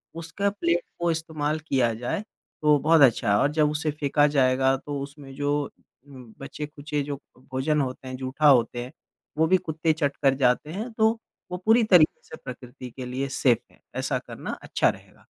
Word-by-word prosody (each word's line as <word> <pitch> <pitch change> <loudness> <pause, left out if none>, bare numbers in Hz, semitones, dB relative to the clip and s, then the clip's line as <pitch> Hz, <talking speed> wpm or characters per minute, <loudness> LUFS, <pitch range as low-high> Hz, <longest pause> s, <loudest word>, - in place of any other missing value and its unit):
उसका 165 +5 -2
प्लेट 175 -4 0 0.2
को 170 0 +1
इस्तेमाल 160 -2 -2
किया 120 -4 +2
जाए 120 - -3 0.4
तो 150 -1 +5
बहुत 160 +2 +4
अच्छा 120 -5 +4
है 100 - +4
और 145 - +2
जब 150 -1 +3
उसे 150 0 -1
फेंका 145 0 +3
जाएगा 135 -2 +3
तो 145 +1 -5
उसमें 140 -1 -9
जो 145 0 -1 0.4
बचे-खुचे 145 +3 -6
जो 140 0 -4 0.3
भोजन 145 +3 +1
होते 130 0 -5
हैं, 130 - -5
जूठा 135 +4 0
होते 120 -2 +3
हैं, 125 - -9 0.5
वो 160 +1 +3
भी 185 +3 +5
कुत्ते 160 -2 -1
चट 145 -3 -1
कर 135 -1 +4
जाते 130 +3 +2
हैं। 220 +6 -5
तो 220 0 +3 0.4
वो 180 - -2
पूरी 225 +2 +5
तरीके 155 -3 +4
से - - -7
प्रकृति 125 0 -9
के 130 +1 -7
लिए 130 +2 -3
सेफ 120 -4 +3
है। - - -25 0.2
ऐसा - - -1
करना - - -7
अच्छा - - +2
रहेगा। - - -10
145 Hz, 185 wpm, -25 LUFS, 130-160 Hz, 0.5 s, तो